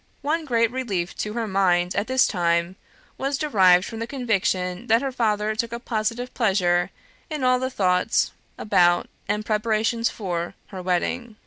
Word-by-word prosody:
One 315 +3 0
great 230 -4 +2
relief 205 -9 -3
to 210 - -3
her 230 -1 -2
mind 180 -2 +2
at 200 +2 -1
this 260 0 +4
time 170 -1 0 0.4
was 275 +1 -1
derived 190 -11 +4
from 225 - -7
the 230 - -3
conviction 200 -6 -1
that 230 +3 +3
her 270 - -1
father 215 -3 0
took 230 +1 -2
a 235 - -4
positive 235 +1 -3
pleasure 180 -6 +2 0.4
in 305 -4 -4
all 255 0 +3
the 260 0 -2
thoughts 185 -3 +1 0.3
about 175 -4 +3 0.2
and 210 +1 -1
preparations 225 +1 +1
for 175 -5 -4
her 190 -2 -7
wedding. 215 +6 -2
215 Hz, 160 wpm, -24 LUFS, 180-240 Hz, 0.4 s, this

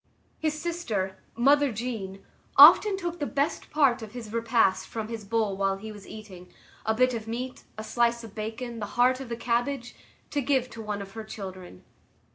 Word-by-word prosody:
His 305 -1 -1
sister, 220 - -3 0.2
mother 280 +3 +4
Jeanne, 215 -4 -5 0.3
often 410 -2 +9
took 345 -2 -4
the 290 - -1
best 285 +3 -1
part 275 -6 +3
of 220 -1 -9
his 225 -3 -8
repast 230 -4 +2
from 220 -1 -5
his 225 -2 -5
bowl 215 -1 0
while 195 0 0
he 220 +2 -8
was 205 -2 -12
eating,—a 210 +1 -7
bit 255 +2 +3
of 225 -2 -5
meat, 250 +3 -5
a 215 - -5
slice 235 +1 +1
of 220 -3 -10
bacon, 225 +2 -5
the 205 - -4
heart 255 +1 +4
of 265 -3 -7
the 235 - -3
cabbage,—to 245 +4 -3
give 260 -2 +1
to 230 - -8
one 210 -2 -4
of 195 - -12
her 220 +1 -7
children. 185 - -9
230 Hz, 180 wpm, -27 LUFS, 210-255 Hz, 0.3 s, often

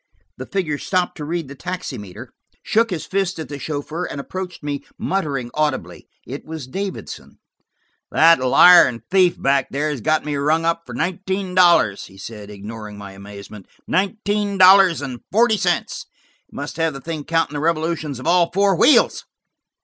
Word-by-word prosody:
The 130 - -8
figure 160 -7 -2
stopped 185 -2 -1
to 150 - -6
read 165 -1 -3
the 140 - -9
taximeter, 140 - -7 0.3
shook 230 +1 +2
his 175 -4 -4
fist 190 -1 -1
at 160 - -7
the 145 -1 -6
chauffeur, 155 +4 -4
and 140 - -6
approached 180 +3 -7
me, 145 -1 -4
muttering 140 -10 -2
audibly. 150 -3 -2 0.2
It 135 +5 -7
was 160 -3 -7
Davidson. 195 +8 -7 0.7
"That 165 +1 +5
liar 175 +8 +7
and 115 -2 -6
thief 185 -2 +3
back 135 -1 +1
there 150 +3 -2
has 140 -5 -5
got 155 +5 +1
me 150 -1 -2
rung 155 +3 +1
up 165 0 -1
for - - -8
nineteen 190 +1 -3
dollars," 175 - +4
he 95 - -16
said, 105 +1 -9
ignoring 105 +1 -9
my 100 -1 -9
amazement. 100 +1 -11 0.2
"Nineteen 205 0 -1
dollars 185 -4 +6
and 130 -3 -6
forty 225 +2 +4
cents! 180 -2 -2 0.4
He - - -20
must 145 +2 -6
have 165 -1 0
the 135 - -7
thing 160 0 -5
counting 165 -1 0
the 145 - -3
revolutions 160 -3 -1
of 130 - -9
all 175 -1 +3
four 195 +1 +2
wheels!" 295 - +4
160 Hz, 170 wpm, -20 LUFS, 135-185 Hz, 0.7 s, liar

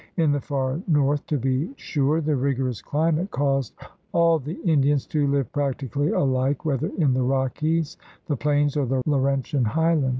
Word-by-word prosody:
In 160 -4 +3
the 145 -1 0
far 135 +2 -2
north, 145 -2 +1
to 150 - 0
be 135 - -1
sure, 150 - 0
the 155 -1 0
rigorous 130 -2 -1
climate 160 +5 0
caused 135 - -1 0.4
all 170 -1 +4
the 150 +5 -6
Indians 145 -4 +2
to 150 -2 0
live 140 -4 0
practically 145 0 -1
alike, 130 +1 0
whether 140 -5 0
in 145 -7 +3
the 130 - +1
Rockies, 135 +5 0 0.3
the 145 - -1
plains, 145 +1 +1
or 145 -3 0
the 130 0 0
Laurentian 140 -1 +1
highland. 155 +3 +2
145 Hz, 165 wpm, -24 LUFS, 135-155 Hz, 0.4 s, all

